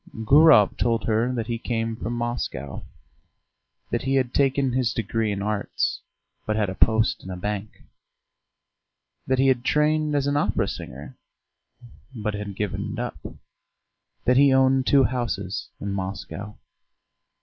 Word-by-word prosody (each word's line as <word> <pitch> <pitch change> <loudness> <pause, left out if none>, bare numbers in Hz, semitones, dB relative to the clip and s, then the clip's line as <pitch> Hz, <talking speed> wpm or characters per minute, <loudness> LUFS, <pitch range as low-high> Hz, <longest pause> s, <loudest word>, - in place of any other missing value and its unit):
Gurov 145 -6 +6
told 115 -2 +1
her 115 +3 +1
that 120 -3 -2
he 115 0 -3
came 115 -1 -2
from 115 +1 -4
Moscow, 120 - -4 1.1
that - - 0
he 135 +1 0
had 130 -2 +1
taken 135 -2 +2
his 125 -2 0
degree 110 0 -1
in 100 -1 -3
Arts, 105 -1 -1 0.5
but 110 - 0
had 105 -3 0
a - - -4
post 110 +3 +2
in 95 - -9
a 90 - -5
bank; 105 +2 -5 1.4
that 130 - +2
he 135 - +3
had 125 -2 +2
trained 150 +1 +1
as 140 -1 +1
an 145 0 +1
opera - - +1
singer, - - -8 1.0
but 105 -2 -3
had 105 -1 -5
given 105 -1 -3
it - - -6
up, - - -4 1.1
that 125 +1 +4
he 140 0 +6
owned 130 0 +3
two 140 -1 +5
houses 115 -7 -2
in 100 - -4
Moscow.... 100 +2 -6
115 Hz, 150 wpm, -24 LUFS, 105-130 Hz, 1.4 s, Gurov